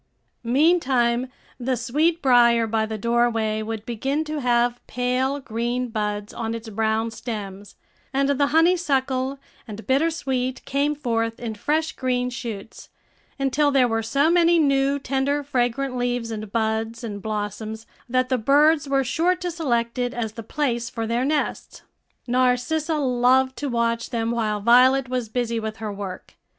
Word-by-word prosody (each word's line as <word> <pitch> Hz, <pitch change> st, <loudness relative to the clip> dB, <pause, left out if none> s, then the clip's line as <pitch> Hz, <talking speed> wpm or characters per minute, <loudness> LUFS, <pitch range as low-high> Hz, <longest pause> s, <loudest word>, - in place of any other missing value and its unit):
Meantime 255 Hz, -3 st, +2 dB, 0.3 s
the 255 Hz, +1 st, -1 dB
sweetbrier 245 Hz, -3 st, +3 dB
by 220 Hz, 0 st, 0 dB
the 220 Hz, 0 st, -4 dB
doorway 230 Hz, -1 st, +1 dB
would 220 Hz, 0 st, -5 dB
begin 270 Hz, +6 st, -1 dB
to 305 Hz, -1 st, -4 dB
have 240 Hz, -1 st, +1 dB
pale 255 Hz, +3 st, 0 dB
green 245 Hz, 0 st, -2 dB
buds 210 Hz, 0 st, -3 dB
on 230 Hz, -1 st, -3 dB
its 230 Hz, 0 st, -7 dB
brown 220 Hz, +1 st, 0 dB
stems, 205 Hz, -4 st, -7 dB, 0.4 s
and 275 Hz, +1 st, +1 dB
the 280 Hz, 0 st, +2 dB
honeysuckle 280 Hz, -5 st, +1 dB, 0.3 s
and 215 Hz, 0 st, -8 dB
bitter 280 Hz, +5 st, +2 dB
sweet 260 Hz, -5 st, -3 dB
came 285 Hz, +2 st, 0 dB
forth 230 Hz, -5 st, -2 dB
in 230 Hz, -2 st, -4 dB
fresh 310 Hz, +9 st, -1 dB
green 250 Hz, -1 st, -1 dB
shoots, 225 Hz, -3 st, -7 dB, 0.5 s
until 275 Hz, +2 st, +2 dB
there 270 Hz, -3 st, +4 dB
were 225 Hz, -1 st, 0 dB
so 280 Hz, +8 st, +2 dB
many 345 Hz, 0 st, +4 dB
new, 275 Hz, -2 st, +2 dB
tender, 275 Hz, +1 st, -1 dB
fragrant 255 Hz, 0 st, -1 dB
leaves, 245 Hz, -2 st, -1 dB
and 215 Hz, -2 st, -6 dB
buds, 225 Hz, +1 st, -1 dB
and 205 Hz, -3 st, -5 dB
blossoms 215 Hz, +1 st, -4 dB, 0.2 s
that 255 Hz, +1 st, +1 dB
the 255 Hz, -2 st, +1 dB
birds 290 Hz, +4 st, +3 dB
were 275 Hz, -1 st, +2 dB
sure 345 Hz, +8 st, +1 dB
to 360 Hz, -1 st, -4 dB
select 240 Hz, -7 st, -1 dB
it 245 Hz, 0 st, -1 dB
as 225 Hz, -3 st, -2 dB
the 230 Hz, -, -7 dB
place 240 Hz, -1 st, -2 dB
for 230 Hz, -1 st, -4 dB
their 235 Hz, +2 st, 0 dB
nests. 295 Hz, +2 st, -2 dB, 0.4 s
Narcissa 255 Hz, +6 st, +1 dB
loved 260 Hz, -1 st, +2 dB
to 290 Hz, -, -3 dB
watch 235 Hz, -1 st, 0 dB
them 230 Hz, -2 st, -1 dB
while 215 Hz, -3 st, -1 dB
Violet 255 Hz, +3 st, +5 dB
was 250 Hz, -3 st, -2 dB
busy 235 Hz, -1 st, -1 dB
with 220 Hz, 0 st, -5 dB
her 215 Hz, -2 st, -5 dB
work. 195 Hz, -2 st, -7 dB
245 Hz, 155 wpm, -23 LUFS, 225-275 Hz, 0.5 s, Violet